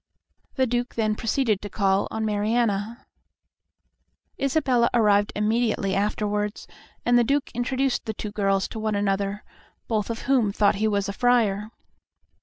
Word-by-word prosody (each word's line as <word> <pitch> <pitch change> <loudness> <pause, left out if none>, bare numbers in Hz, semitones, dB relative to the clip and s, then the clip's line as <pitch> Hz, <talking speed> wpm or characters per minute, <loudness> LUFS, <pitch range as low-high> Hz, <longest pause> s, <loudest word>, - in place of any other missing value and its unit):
The 260 - +2
Duke 245 0 -2
then 215 -2 +1
proceeded 225 -1 0
to 205 - -6
call 195 0 +1
on 220 0 -3
Mariana. 215 +1 -1 1.4
Isabella 270 -4 +2
arrived 205 -3 +3
immediately 215 -2 0
afterwards, 210 +1 -1 0.4
and 240 0 +4
the - - +4
Duke 280 +4 0
introduced 260 +2 -1
the 220 - -3
two 210 - -5
girls 195 -2 0
to 225 - -6
one 215 -1 -1
another, 200 0 -1 0.4
both 215 -2 -1
of 230 0 -4
whom 255 -7 +2
thought 205 0 +2
he 220 - +3
was 200 -2 0
a 200 - -3
friar. 215 -3 +2
215 Hz, 145 wpm, -24 LUFS, 205-240 Hz, 1.4 s, and